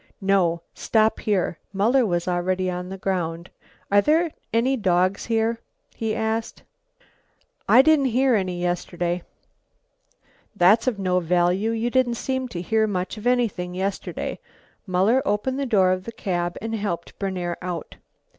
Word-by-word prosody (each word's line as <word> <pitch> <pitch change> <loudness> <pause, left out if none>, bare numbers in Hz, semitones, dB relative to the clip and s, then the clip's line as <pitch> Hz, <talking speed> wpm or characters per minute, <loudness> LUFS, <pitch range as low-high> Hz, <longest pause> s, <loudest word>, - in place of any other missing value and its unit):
"No, 185 -4 +1
stop 220 -1 +1
here." 190 -5 -1
Muller 230 +5 +3
was 175 -2 -1
already 185 +1 0
on 180 0 -5
the 195 - -6
ground. 175 -3 -3 0.4
"Are 205 0 +6
there 320 +7 +2 0.2
any 245 +4 +2
dogs 185 -3 +1
here?" 225 0 +1 0.3
he 220 -1 -2
asked. 225 0 -2 1.1
"I 260 - +8
didn't 310 -2 +4
hear 255 +2 +2
any 185 -4 0
yesterday." 175 0 -2 1.3
"That's 205 +6 +4
of 240 -5 +1
no 185 -2 +1
value. 180 +4 +1
You 230 +1 -1
didn't 255 -2 +2
seem 260 +2 -2
to 175 -7 -6
hear 220 +3 +2
much 185 -1 -3
of 215 +3 -4
anything 215 -8 0
yesterday." 190 +1 -3 0.5
Muller 195 +8 +3
opened 235 +6 -1
the 275 - -1
door 190 -6 +4
of 185 0 -2
the 230 - -5
cab 175 -5 -2
and 225 0 -3
helped 200 -6 -4
Berner 180 -3 -2
out. 180 -3 -5
195 Hz, 145 wpm, -23 LUFS, 180-230 Hz, 1.3 s, I